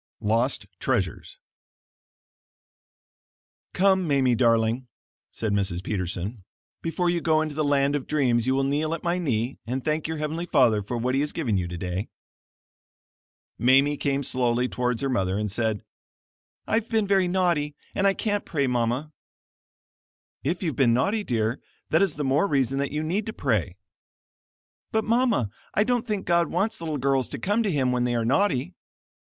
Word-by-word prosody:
LOST 115 +5 +1
TREASURES - - -2 2.4
"Come, 190 -1 +3
Mamie, 135 -4 +3
darling," 115 +1 +2 0.4
said 110 -2 -2
Mrs. 95 -3 0
Peterson, 95 +2 -3 0.4
"before 170 +2 -1
you 175 -1 -1
go 160 -1 +3
into 155 -1 -2
the 155 +1 -1
land 140 0 +2
of 145 - -3
dreams 125 -5 +1
you 130 - +2
will 135 - +1
kneel 150 +4 0
at 165 - -10
my 175 +1 0
knee 125 -6 -1
and 130 +2 -3
thank 155 0 0
your 160 0 -3
heavenly 155 +3 -3
Father 125 -9 +4
for 115 +5 -4
what 125 +2 -1
he 135 - +2
has 150 - -1
given 130 -11 -1
you 90 -2 0
today." 90 +3 -4 1.5
Mamie 135 +4 +4
came 140 -1 -1
slowly 125 -1 +1
towards 125 0 -2
her 135 - 0
mother, 95 -6 0
and 105 -1 -2
said, 110 -1 -1 0.8
"I've 225 +2 0
been 220 -3 +2
very 195 -2 +3
naughty, 175 -5 +1 0.2
and 200 0 +2
I 195 - +3
can't 205 -2 -1
pray, 145 -5 -1
Mama." 125 +4 -1 1.3
"If 170 +7 -1
you've 160 -7 -1
been 120 -3 +4
naughty 205 - +1
dear, 115 - -1 0.3
that 160 - +4
is 195 - +2
the 150 - -3
more 140 +8 +2
reason 135 - +1
that 140 -1 -1
you 150 +1 -2
need 190 +7 -1
to 220 - -4
pray." - - -1 1.2
"But, 220 -1 +1
Mama, 230 - +1 0.2
I 205 - +4
don't 245 0 0
think 210 -3 -2
God 170 -1 +3
wants 210 +2 -1
little 160 -3 -2
girls 135 -1 +1
to - - -5
come 205 +4 0
to 215 - 0
Him 135 -7 +1
when 125 -1 +1
they 120 -1 0
are 115 -1 0
naughty." 130 - +1
140 Hz, 170 wpm, -25 LUFS, 120-170 Hz, 2.4 s, Father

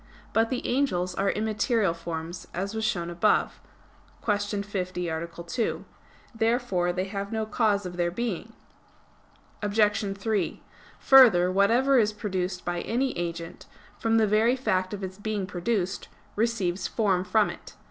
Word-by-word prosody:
But 225 0 +3
the 255 - -3
angels 185 -9 0
are 195 +2 0
immaterial 215 -2 +1
forms, 165 +1 -6
as 195 +4 -3
was 220 0 -3
shown 175 -6 -1
above 190 +5 +1 0.6
(Q. 205 -1 0
50, 185 -3 -3
A. 165 +1 -3
2). 170 +7 -3 0.5
Therefore 225 -6 +1
they 180 +1 -1
have 200 +1 -5
no 220 -1 -1
cause 215 -2 +1
of 180 -1 -6
their 175 -1 +1
being. 225 +2 -4 1.1
Obj. 205 -1 +1
3: 215 +1 -1 0.3
Further, 220 -10 +7
whatever 235 +8 +4
is 215 -1 +2
produced 185 -3 -3
by 175 0 -2
any 255 +3 -1
agent, 170 -1 -5 0.3
from 225 0 +2
the 220 - +4
very 215 +4 +3
fact 185 -8 0
of 200 - -8
its 190 +1 -6
being 210 -2 -2
produced, 190 +1 -2 0.3
receives 205 -5 0
form 195 -5 +1
from 215 +3 +2
it. - - -12
200 Hz, 145 wpm, -27 LUFS, 180-225 Hz, 1.1 s, Further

